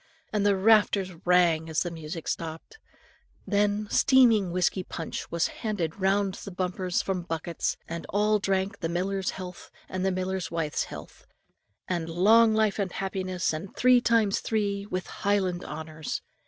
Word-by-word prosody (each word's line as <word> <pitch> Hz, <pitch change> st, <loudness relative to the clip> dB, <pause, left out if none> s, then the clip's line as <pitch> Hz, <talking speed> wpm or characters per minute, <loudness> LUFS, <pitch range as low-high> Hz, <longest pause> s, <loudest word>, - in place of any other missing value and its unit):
and 210 Hz, -1 st, +1 dB
the 205 Hz, -1 st, +4 dB
rafters 200 Hz, -2 st, +3 dB
rang 170 Hz, -3 st, +4 dB
as 160 Hz, -, +1 dB
the 175 Hz, -, -4 dB
music 160 Hz, 0 st, -7 dB
stopped. 165 Hz, -, -5 dB, 0.7 s
Then 205 Hz, 0 st, +1 dB
steaming 235 Hz, -8 st, +5 dB
whiskey 185 Hz, +1 st, +1 dB
punch 165 Hz, -2 st, -6 dB
was 170 Hz, 0 st, 0 dB
handed 200 Hz, -7 st, -2 dB
round 195 Hz, 0 st, +1 dB
in 195 Hz, -, -6 dB
bumpers 185 Hz, 0 st, -1 dB
from 190 Hz, -2 st, -2 dB
buckets, 165 Hz, 0 st, -3 dB
and 170 Hz, 0 st, -6 dB
all 210 Hz, +1 st, +2 dB
drank 195 Hz, 0 st, -1 dB
the 165 Hz, -, -2 dB
miller's 190 Hz, +2 st, -1 dB
health, 180 Hz, -2 st, -8 dB, 0.2 s
and 185 Hz, 0 st, -3 dB
the 190 Hz, -, +2 dB
miller's 185 Hz, -1 st, -2 dB
wife's 160 Hz, -3 st, -1 dB
health, -, -, -11 dB, 0.6 s
and 170 Hz, -3 st, -2 dB
long 220 Hz, +6 st, +5 dB
life 215 Hz, -2 st, +2 dB
and 190 Hz, -3 st, -1 dB
happiness, 185 Hz, -3 st, -2 dB
and 165 Hz, +5 st, -6 dB
three 250 Hz, -1 st, +5 dB
times 225 Hz, -4 st, +2 dB
three, 205 Hz, -2 st, -1 dB
with 185 Hz, -2 st, -3 dB
Highland 190 Hz, -3 st, -1 dB
honours. 155 Hz, 0 st, -5 dB
190 Hz, 155 wpm, -27 LUFS, 170-205 Hz, 0.7 s, steaming